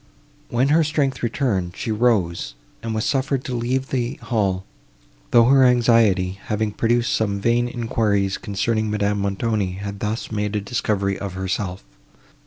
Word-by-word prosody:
When 125 +3 +1
her 160 +2 +4
strength 145 -3 0
returned, 105 -8 -1
she 110 - -3
rose, 95 - +1 0.3
and 115 -1 -3
was 110 - -1
suffered 135 -1 0
to 130 - -5
leave 130 +3 -1
the 125 -2 -1
hall, 95 -5 -1 0.6
though 120 -1 +6
her 135 +2 +6
anxiety, 115 -7 +3
having 105 0 -1
produced 120 +3 +1
some 100 -2 0
vain 120 +3 +2
enquiries, 105 -5 0
concerning 110 +1 -1
Madame 105 -1 0
Montoni, 100 -1 -1
had 100 +1 -6
thus 105 +2 -3
made 105 -1 -2
a - - +1
discovery 100 -2 -1
of 100 -2 -5
herself. 95 0 -3
110 Hz, 150 wpm, -22 LUFS, 100-120 Hz, 0.6 s, though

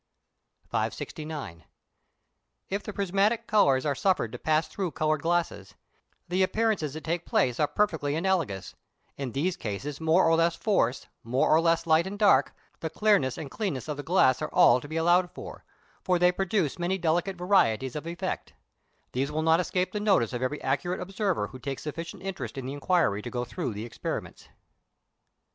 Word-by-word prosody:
569. 150 - -4 1.1
If 200 +1 -1
the 210 - -6
prismatic 200 +4 +1
colours 140 - +3
are 145 - +2
suffered 175 - +1
to 125 - -7
pass 155 +1 +1
through 190 -3 -3
coloured 155 -1 0
glasses, 170 +1 -1 0.5
the 180 +2 0
appearances 190 -7 +1
that 155 - -7
take 170 +1 -2
place 125 -6 +1
are 150 - +3
perfectly 160 -9 0
analogous; 165 - -1 0.4
in 135 -4 -5
these 175 +6 0
cases 135 - -5
more 160 +3 +4
or 165 - +4
less 165 0 +2
force, 135 - 0 0.2
more 125 +4 +1
or 160 - +6
less 165 0 +2
light 165 +2 +3
and 200 +2 -6
dark, 200 -10 +4 0.2
the 160 - -3
clearness 165 - +2
and 150 -4 -7
cleanness 185 - -3
of 150 - -3
the 145 - -5
glass 145 -6 +3
are - - -2
all 125 +1 +5
to 145 - -9
be 155 +2 -4
allowed 175 +2 +3
for, - - -10 0.5
as 180 -1 +4
they 180 0 +5
produce 180 -4 -1
many 175 +2 0
delicate 175 +2 0
varieties 135 - +2
of 150 +2 -5
effect: 170 +1 -4 0.6
these 135 +3 -1
will 155 +1 -1
not 160 +1 +4
escape 180 +1 -1
the 210 - -3
notice 195 - +2
of 120 - -3
every 130 +4 -1
accurate 145 +7 -1
observer 190 - -1
who 130 - -10
takes 135 +1 -5
sufficient 165 +5 -6
interest 195 -7 -5
in 135 - -4
the 135 - -4
inquiry 145 - +1
to 120 - -6
go 120 0 -3
through 140 +1 -4
the 105 +2 -5
experiments. 120 - -6
160 Hz, 180 wpm, -27 LUFS, 135-185 Hz, 1.1 s, or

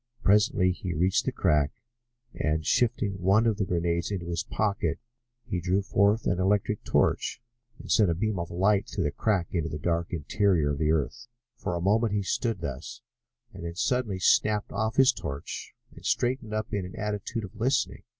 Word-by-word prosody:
Presently 100 -2 +4
he 90 -1 -4
reached 90 +4 +2
the - - 0
crack 75 -2 +2 0.6
and, 80 0 -1
shifting 105 -6 +1
one 100 +5 +4
of 110 -3 +2
the 100 - 0
grenades 85 -1 0
into 95 -4 -3
his 85 -1 -1
pocket, 105 -2 -1 0.5
he 100 -7 -3
drew 95 +3 +1
forth 100 +3 +2
an 90 - +1
electric 100 +2 +1
torch - - +1 0.4
and - - -8
sent 105 -4 +4
a 85 - +1
beam 105 +1 -1
of 85 - -4
light 95 +3 +2
through - - -2
the 75 - 0
crack 95 +1 0
into 80 -3 -1
the 75 - -4
dark 85 +2 -1
interior 85 -1 +1
of 70 - -3
the 75 0 +2
earth. 80 +8 -1 0.3
For 90 - -3
a 85 - -2
moment 105 +3 +2
he 105 -1 0
stood 110 0 -1
thus, 85 - -6 0.5
and - - -9
then 85 0 -5
suddenly 115 -1 0
snapped 105 +3 +2
off 110 +2 -1
his 135 0 +6
torch 75 -9 -6 0.2
and - - -13
straightened 120 -3 0
up 110 +1 -3
in 100 -2 0
an 90 - -8
attitude 105 +1 -3
of 95 - -9
listening. 130 +3 0
95 Hz, 190 wpm, -27 LUFS, 85-110 Hz, 0.6 s, his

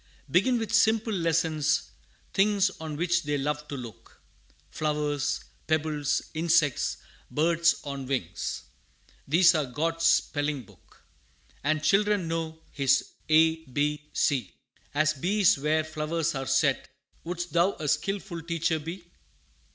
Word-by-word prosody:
Begin 240 - +3
with 225 -2 -3
simple 220 0 +3
lessons 165 -4 +1 0.4
things 200 -1 +3
On 160 -2 -5
which 175 +1 +1
they 145 -2 -1
love 150 +2 -2
to 140 - -5
look: 120 -4 -11 0.5
Flowers, 150 -2 -1 0.3
pebbles, 155 -2 0
insects, 160 -4 +2 0.3
birds 170 +2 +3
on 140 -2 -5
wings 130 -11 -3 0.6
These 170 +4 +6
are 155 -4 0
God's 165 +6 -1
spelling 145 -4 +1
book. - - -22 0.6
And 155 +2 0
children 200 +1 +2
know 160 -1 -4
His 135 -1 +1 0.2
A, 160 +1 +5
B, 150 +3 -2
C, 125 -9 0 0.4
As 155 0 +3
bees 180 +3 +2
where 155 +2 +1
flowers 155 +1 -2
are 135 -1 -4
set: 135 +1 +1 0.3
Would'st 175 0 -4
thou 175 +4 +3
a 155 - -6
skilful 195 +1 -1
teacher 165 -1 -1
be? 170 +4 -7
155 Hz, 125 wpm, -27 LUFS, 145-170 Hz, 0.6 s, These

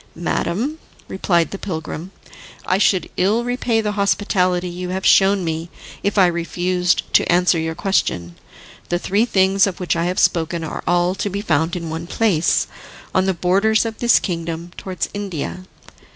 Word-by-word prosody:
"Madam," 210 - -2 0.3
replied 175 -3 +1
the 195 - -6
pilgrim, 160 -1 -5 0.6
"I 185 - +1
should 190 -3 +2
ill 210 +6 +2
repay 245 -2 0
the 210 -1 -1
hospitality 185 -3 +1
you 180 +1 -5
have 190 +1 -3
shown 195 0 +5
me 165 0 -3 0.3
if 200 +1 -1
I 190 - +7
refused 180 +1 0
to - - +4
answer 175 -1 +3
your 160 0 -3
question. 90 - -1 0.6
The 175 - +1
three 200 +5 +1
things 195 -3 +3
of 185 - -5
which 175 -2 0
I 170 0 0
have 180 +1 -2
spoken 165 0 +1
are 160 - -5
all 175 +1 +2
to 205 - -3
be 200 +1 -3
found 160 -2 0
in 170 -2 -5
one 165 +1 -5
place, 180 -6 +2 0.5
on 185 0 +2
the 190 - +1
borders 200 +6 +2
of 225 -1 -5
this 240 -1 +5
kingdom, 170 -1 -4
towards 185 -2 -4
India. 185 -2 -5
180 Hz, 165 wpm, -20 LUFS, 170-200 Hz, 0.6 s, I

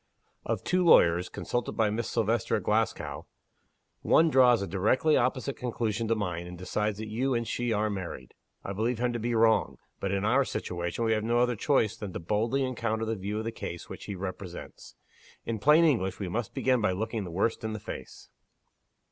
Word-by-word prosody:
Of - - -2
two 185 0 +1
lawyers, 90 - +5
consulted 120 -1 -3
by 110 -2 +1
Miss 115 +2 -2
Silvester 115 -1 +1
at - - -2
Glasgow, - - -1 0.7
one 165 0 +4
draws 125 -6 +5
a - - -4
directly 110 - +2
opposite 130 +2 0
conclusion 115 -2 -2
to 115 - +2
mine, 90 -5 -3
and 90 0 -8
decides 105 +3 -2
that 110 0 -5
you 125 +5 0
and 115 -1 -1
she 120 -1 -1
are 110 0 +1
married. 95 -11 -6 0.3
I 100 - -4
believe 115 +4 -1
him 120 +1 0
to 120 - -2
be 120 +1 -1
wrong, 110 0 +3 0.2
but 100 - -2
in 100 +1 0
our 130 +6 +4
situation, 85 -1 -3
we 110 - +2
have 110 -1 +1
no 120 +2 +1
other 125 0 +2
choice 115 -3 +1
than 105 -5 -7
to - - -4
boldly 110 +10 0
encounter 115 -3 -1
the 115 0 -1
view 100 +1 -4
of 110 - -2
the 115 - -3
case 85 -6 -7
which - - -8
he 100 - -5
represents. 95 -1 -8 0.5
In 115 -2 -3
plain 150 +8 +6
English, 100 - +1
we 95 -3 -4
must 110 +4 -3
begin 130 -2 +2
by 95 - +2
looking 110 +2 -3
the 90 - -6
worst 100 +8 -1
in 110 0 -2
the 110 - -4
face." - - -9
110 Hz, 205 wpm, -28 LUFS, 100-120 Hz, 0.7 s, plain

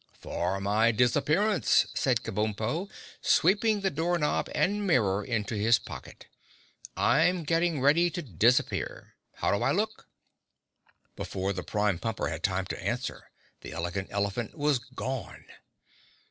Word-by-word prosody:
"For 90 +3 -3
my 105 +4 +3
disappearance," 150 - +3
said 125 -3 +1
Kabumpo, 110 - -2 0.3
sweeping 205 +4 +3
the 195 - 0
door 170 +4 0
knob 150 -3 0
and 205 +1 +1
mirror 105 - +2
into 110 0 -2
his 110 +2 +4
pocket. - - -10 0.7
"I'm 180 -1 +3
getting 165 0 +1
ready 160 +6 +4
to 170 +1 -5
disappear. 115 - 0 0.2
How - - 0
do 100 - -2
I - - +2
look?" 215 +3 -2 1.1
Before 95 +1 -3
the 90 - -4
Prime 105 -2 0
Pumper 115 -1 -2
had - - -5
time - - 0
to - - -6
answer, - - -3 0.3
the - - -9
Elegant 85 +3 -3
Elephant 100 +6 -2
was 145 -3 +2
gone. 130 +2 -6
120 Hz, 130 wpm, -28 LUFS, 105-170 Hz, 1.1 s, his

